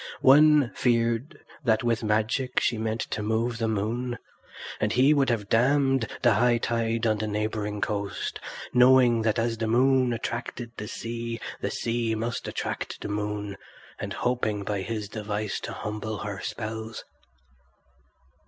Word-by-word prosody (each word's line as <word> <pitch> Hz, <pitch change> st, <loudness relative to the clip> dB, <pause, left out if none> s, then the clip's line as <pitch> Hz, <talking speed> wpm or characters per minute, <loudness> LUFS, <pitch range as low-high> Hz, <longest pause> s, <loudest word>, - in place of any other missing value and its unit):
One 150 Hz, -1 st, +6 dB
feared 120 Hz, +4 st, 0 dB, 0.2 s
that 110 Hz, -2 st, +2 dB
with 120 Hz, 0 st, +1 dB
magic 110 Hz, +4 st, +1 dB
she 115 Hz, -2 st, 0 dB
meant 110 Hz, +1 st, -1 dB
to -, -, -2 dB
move 115 Hz, +2 st, 0 dB
the 115 Hz, -, 0 dB
moon; 115 Hz, +4 st, -1 dB, 0.6 s
and 105 Hz, -, +1 dB
he 130 Hz, +5 st, +5 dB
would 140 Hz, -3 st, +2 dB
have 110 Hz, -4 st, -1 dB
dammed 135 Hz, +1 st, +3 dB, 0.2 s
the 120 Hz, -, +6 dB
high 120 Hz, +3 st, +3 dB
tide 115 Hz, 0 st, -1 dB
on 110 Hz, -2 st, +2 dB
the 110 Hz, -, -2 dB
neighbouring 105 Hz, 0 st, -2 dB
coast, 100 Hz, -1 st, -2 dB, 0.3 s
knowing 125 Hz, -2 st, +6 dB
that 110 Hz, -1 st, +1 dB
as 115 Hz, -1 st, 0 dB
the 115 Hz, -, 0 dB
moon 130 Hz, +2 st, +3 dB
attracted 120 Hz, 0 st, -4 dB
the 105 Hz, -, -5 dB
sea 115 Hz, 0 st, -5 dB, 0.2 s
the -, -, -1 dB
sea 115 Hz, -1 st, -1 dB
must 115 Hz, +2 st, -3 dB
attract -, -, -4 dB
the -, -, -4 dB
moon, 105 Hz, -1 st, -3 dB, 0.4 s
and -, -, -4 dB
hoping 110 Hz, -5 st, -1 dB
by 100 Hz, 0 st, -2 dB
his 105 Hz, +1 st, -4 dB
device 105 Hz, -1 st, -3 dB
to -, -, -6 dB
humble 110 Hz, 0 st, -4 dB
her 100 Hz, 0 st, -5 dB
spells. 110 Hz, +2 st, -5 dB
115 Hz, 150 wpm, -27 LUFS, 105-120 Hz, 0.6 s, One